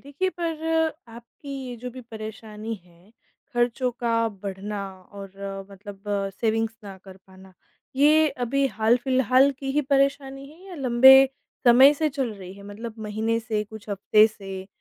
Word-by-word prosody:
देखिए 285 +7 -2
पर 325 -2 -3 0.5
आपकी 235 +5 -12 0.2
ये 245 - -6
जो 250 +2 -7
भी 255 +1 -10
परेशानी 220 0 -7
है 175 +3 -23 0.4
ख़र्चों 240 +1 +1
का 230 -1 +1
बढ़ना 200 +1 -5 0.3
और 195 0 -8
मतलब 195 0 -11 0.4
सेविंग्स 225 0 0
ना 195 -1 -9
कर 190 -1 -12
पाना, 190 0 -16 0.4
ये 305 +2 +5 0.2
अभी 275 +3 +1
हाल-फिलहाल 255 +4 +3
की 270 0 -4
ही 295 - +2
परेशानी 275 0 0
है 335 +5 -17
या 370 - -8
लंबे 265 -2 +7 0.5
समय 260 +4 +8
से 310 +1 0
चल 265 -5 -3
रही 185 -2 -10
है 200 - -13
मतलब 225 +2 -7
महीने 220 +1 -1
से, 220 -2 -2
कुछ 215 0 -12
हफ्ते 210 +2 +4
से? 195 -3 -8
230 Hz, 150 wpm, -24 LUFS, 205-270 Hz, 0.5 s, समय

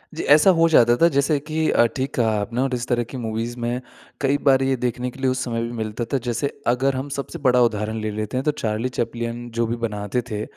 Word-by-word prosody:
जी - - -3
ऐसा 155 +6 +6
हो 165 0 +5
जाता 120 -6 +5
था 170 - +7
जैसे 140 0 +1
कि 155 +2 -1
अ, 120 - +4
ठीक 135 +2 -2
कहा 115 -3 +2
आपने 115 +5 -2
और 135 -1 0
इस 120 +1 -4
तरह 120 -1 +1
की 130 - -5
मूवीज़ 115 +1 -3
में 120 +2 -2 0.4
कई 140 0 +2
बार 135 0 +5
ये 135 0 +1
देखने 125 +1 -2
के 135 - -15
लिए 130 -1 +1
उस 130 0 -2
समय 115 -2 -2
भी 115 - -4
मिलता 110 +1 -3
था - - +4
जैसे 120 +4 0 0.2
अगर 130 +3 +2
हम 135 +2 -4
सबसे 140 - -5
बड़ा 125 -1 +3
उदाहरण 110 -1 0
ले 110 - -2
लेते 105 +3 -3
हैं 130 - -1
तो 150 - +2
चार्ली 110 +3 -1
चैपलिन 120 +1 -3
जो 115 - +3
भी 120 - -1
बनाते 105 +2 -2
थे 105 0 -2
120 Hz, 250 wpm, -22 LUFS, 115-135 Hz, 0.4 s, था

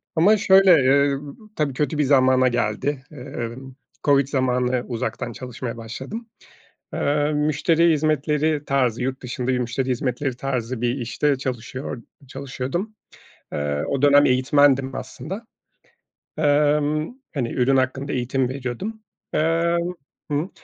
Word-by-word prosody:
ama 200 +7 +5
şöyle, 195 -2 +6
eee, 140 +1 +3
b 145 - -8 0.2
tabii 145 -3 0
kötü 150 +3 -1
bir 150 - +3
zamana 130 -2 +4
geldi. 125 +3 -1
Eee, 125 -4 -6 0.5
COVID 140 -2 +4
zamanı 125 -2 0
uzaktan 120 0 -3
çalışmaya 125 0 -6
başladım. 135 - -7 0.6
Eee, 145 +1 +1
müşteri 155 +3 +2
hizmetleri 150 0 +1
tarzı, 125 -4 +1
yurt 130 +1 -3
dışında 125 0 -4
bir 130 -1 +1
müşteri 125 +2 -2
hizmetleri 125 +1 -1
tarzı 125 -3 -3
bir 120 0 +1
işte 135 +3 0
çalışıyor 130 -1 -5 0.3
çalışıyordum. 140 - -4 0.6
Eee, 75 0 -1
o 140 -1 -1
dönem 145 0 +6
eğitmendim 135 +1 +3
aslında. 195 +8 -7 0.9
Emm, 150 +3 +2 0.2
hani, 125 -5 -2
ürün 135 +2 +2
hakkında 135 +2 -1
eğitim 130 +1 0
veriyordum. 135 - -5 0.3
Emm, 170 +2 +1 0.4
hı, 150 +5 0
135 Hz, 120 wpm, -23 LUFS, 125-150 Hz, 0.9 s, şöyle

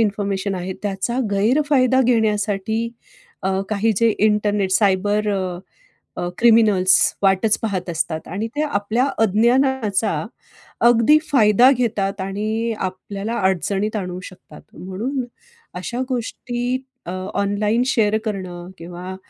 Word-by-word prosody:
Information 200 -2 -1
आहे 185 +1 -4
त्याचा 205 +5 -2
गैरफायदा 260 +4 +3
घेण्यासाठी 220 -1 0 0.5
अ, 190 - 0 0.2
काही 215 +2 +1
जे 230 +1 +3
इंटरनेट 210 -2 +1
सायबर 205 +1 +2
अ, 185 -3 -2 0.6
अ 175 - -2
क्रिमिनल्स 210 -5 +5 0.3
वाटच 195 +3 +3
पाहत 190 -5 -3
असतात 160 -1 -3
आणि 205 +6 -3
ते 300 - 0
आपल्या 230 -2 0
अज्ञानाचा 225 0 +2 0.8
अगदी 240 +6 +5
फायदा 235 -1 +5
घेतात 200 -5 -1
आणि 215 +4 -2
आपल्याला 195 +4 -4
अडचणीत 195 +3 0
आणू 180 -2 -4
शकतात. 185 - -13 0.2
म्हणून 235 +9 -4 0.5
अशा 235 +8 -4
गोष्टी 245 +1 -2 0.3
अ, 175 - -3 0.3
ऑनलाईन 210 +4 +1
शेअर 220 -4 +2
करणं 185 -4 -5
किंवा 180 +2 -7
210 Hz, 110 wpm, -20 LUFS, 190-230 Hz, 0.8 s, क्रिमिनल्स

